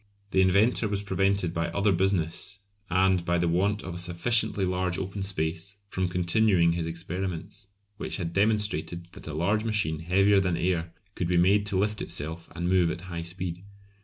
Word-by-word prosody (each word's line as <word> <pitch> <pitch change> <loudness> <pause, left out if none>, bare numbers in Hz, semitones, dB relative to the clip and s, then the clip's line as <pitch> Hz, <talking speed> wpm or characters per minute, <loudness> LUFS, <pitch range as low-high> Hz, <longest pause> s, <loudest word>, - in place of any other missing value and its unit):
The 95 - +4
inventor 100 +5 +3
was 100 -1 -2
prevented 95 -2 +1
by 85 -1 -1
other 100 +5 +1
business, 95 0 +1 0.3
and 95 -1 +3
by 85 0 +1
the 85 0 +1
want 100 +5 +1
of 95 - -6
a - - -6
sufficiently 95 +3 +1
large 90 -1 -1
open 95 +1 -4
space, 95 +1 -3
from 95 -2 -1
continuing 90 0 +3
his 85 -1 -2
experiments, 90 +3 -5 0.3
which - - -4
had 85 -3 -4
demonstrated 100 -4 0
that - - -12
a 75 - -5
large 100 +7 +1
machine 105 -9 -1
heavier 100 +4 +4
than 90 -3 0
air 85 -1 -1 0.2
could 90 - -2
be 90 0 +2
made 100 +4 +4
to 100 -2 0
lift 105 +2 0
itself 80 +3 -4
and 85 +1 -2
move 90 -2 +3
at 85 - -4
high 85 -1 -3
speed. 90 +1 -5
90 Hz, 180 wpm, -27 LUFS, 85-100 Hz, 0.3 s, The